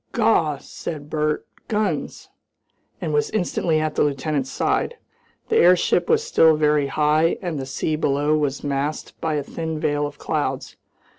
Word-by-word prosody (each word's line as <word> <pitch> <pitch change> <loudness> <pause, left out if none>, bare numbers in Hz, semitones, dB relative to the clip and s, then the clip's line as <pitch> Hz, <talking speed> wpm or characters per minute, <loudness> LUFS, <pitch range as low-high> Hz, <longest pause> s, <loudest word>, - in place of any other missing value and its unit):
"Gaw!" 215 - +2
said 150 +1 -8
Bert 150 0 0 0.2
"guns!" 210 -8 -2 0.7
and - - -3
was 445 0 +1
instantly 175 -5 0
at 155 0 -1
the - - 0
lieutenant's 140 -1 0
side. - - 0 0.5
The - - +3
airship 180 0 +4
was 460 -1 +3
still 165 - +4
very 150 -2 +2
high 155 +5 +2
and 175 -8 -4
the 135 - -5
sea 155 +3 -1
below 145 0 +1
was 145 -2 -1
masked 145 +1 -3
by 160 -1 0
a 145 - -1
thin 160 +1 -4
veil 145 -1 0
of 145 - -11
clouds. - - -3
155 Hz, 155 wpm, -22 LUFS, 145-165 Hz, 0.7 s, airship